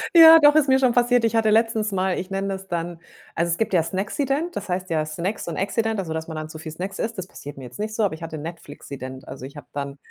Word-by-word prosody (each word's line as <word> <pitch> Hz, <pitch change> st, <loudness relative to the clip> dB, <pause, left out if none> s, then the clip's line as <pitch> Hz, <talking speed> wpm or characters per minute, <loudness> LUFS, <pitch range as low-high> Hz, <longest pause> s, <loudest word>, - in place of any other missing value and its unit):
Ja, 325 Hz, -1 st, +11 dB
doch 295 Hz, -1 st, +7 dB
ist 310 Hz, -2 st, +4 dB
mir 265 Hz, 0 st, +5 dB
schon 255 Hz, -2 st, +4 dB
passiert. 245 Hz, 0 st, +3 dB
Ich 230 Hz, -, 0 dB
hatte 225 Hz, -1 st, +3 dB
letztens 220 Hz, -1 st, +2 dB
mal 190 Hz, -1 st, 0 dB
ich 185 Hz, -, -6 dB
nenne 195 Hz, 0 st, -2 dB
das 195 Hz, 0 st, -5 dB
dann 170 Hz, -1 st, -3 dB, 0.4 s
also, 170 Hz, +1 st, 0 dB
es 170 Hz, -, 0 dB
gibt 225 Hz, -, -1 dB
ja 175 Hz, -, +5 dB
Snacksident, 270 Hz, -, -2 dB
das -, -, -5 dB
heißt 180 Hz, 0 st, -2 dB
ja 155 Hz, -1 st, +1 dB
Snacks 170 Hz, +7 st, -3 dB
und 170 Hz, -, -4 dB
Accident, 220 Hz, +2 st, 0 dB
also, 165 Hz, -4 st, -3 dB
dass 160 Hz, 0 st, -4 dB
man 160 Hz, -, -6 dB
dann 155 Hz, 0 st, -5 dB
zu 155 Hz, -, -9 dB
viel 160 Hz, 0 st, -7 dB
Snacks 190 Hz, +4 st, -6 dB
isst. 225 Hz, 0 st, -2 dB
Das 185 Hz, -, -4 dB
passiert 145 Hz, -6 st, -10 dB
mir 135 Hz, -, -9 dB
jetzt 125 Hz, +1 st, -11 dB
nicht 215 Hz, +1 st, -3 dB
so, 220 Hz, -, +1 dB
aber 195 Hz, -6 st, +1 dB
ich 160 Hz, -, -9 dB
hatte 160 Hz, -1 st, -5 dB
Netflixident. 140 Hz, -5 st, -8 dB
Also, 130 Hz, -1 st, -8 dB
ich 140 Hz, +3 st, -11 dB
habe 145 Hz, -, -10 dB
dann 140 Hz, -1 st, -4 dB
185 Hz, 280 wpm, -23 LUFS, 160-225 Hz, 0.4 s, Ja